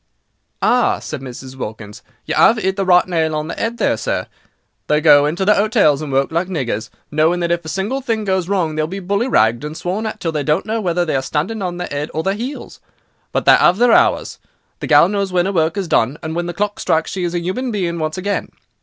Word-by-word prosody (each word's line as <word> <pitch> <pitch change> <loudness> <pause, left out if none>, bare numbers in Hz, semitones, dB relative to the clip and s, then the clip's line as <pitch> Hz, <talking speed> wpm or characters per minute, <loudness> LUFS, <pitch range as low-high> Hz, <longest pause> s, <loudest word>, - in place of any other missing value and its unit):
"Ah," 245 0 +3
said 155 -4 -7
Mrs. 130 0 -9
Wilkins, 105 -4 -8 0.2
"you - - -2
'ave 225 - +4
'it 190 -2 -1
the 195 -1 -2
right 180 -1 +5
nail 160 -3 0
on 150 0 -3
the - - -4
'ead, 235 +1 -8
there, - - +1
sir. - - -2 0.6
They 150 - +3
go 145 -2 +6
into 175 +6 -1
the 210 - +5
'otels 200 -9 +2
and 150 -3 -5
work 135 +2 +1
like 170 +3 0
niggers, 120 - -3 0.2
knowing 160 +4 +2
that 170 0 0
if 170 0 0
a 155 - -7
single 205 +10 -2
thing 225 -4 -2
goes 190 -3 -1
wrong 180 -6 0
they 155 - -1
will 155 - -1
be 190 +4 -5
bully 200 +6 -1
ragged 115 - +2
and 150 +1 -6
sworn 190 +6 -3
at 215 0 -6
till 165 -4 -2
they 155 -2 -2
don't 150 +5 0
know 225 +1 -2
whether 175 -2 0
they 155 - -1
are 135 - +1
standing 160 +11 -2
on 180 -2 -3
their 180 - -4
'ead 145 +1 -3
or 160 - -1
their 195 - 0
'eels. 250 +7 -7 0.5
But - - -1
they - - +7
'ave 180 - +4
their 240 +1 +4
hours; - - +2 0.4
the - - -5
gal 150 +2 +6
knows 200 -1 -2
when 180 -1 +2
'er 195 - -1
work 165 +2 +1
is 195 -3 -2
done, 130 -1 +1
and 160 +1 -4
when 175 0 -2
the 175 - -5
clock 205 +2 -2
strikes 160 -2 0
she 185 - -3
is 175 0 -2
a - - +1
'uman 190 +10 -3
being 175 -6 -2
once 155 +1 -3
again. 200 +2 -2
175 Hz, 250 wpm, -18 LUFS, 155-200 Hz, 0.6 s, they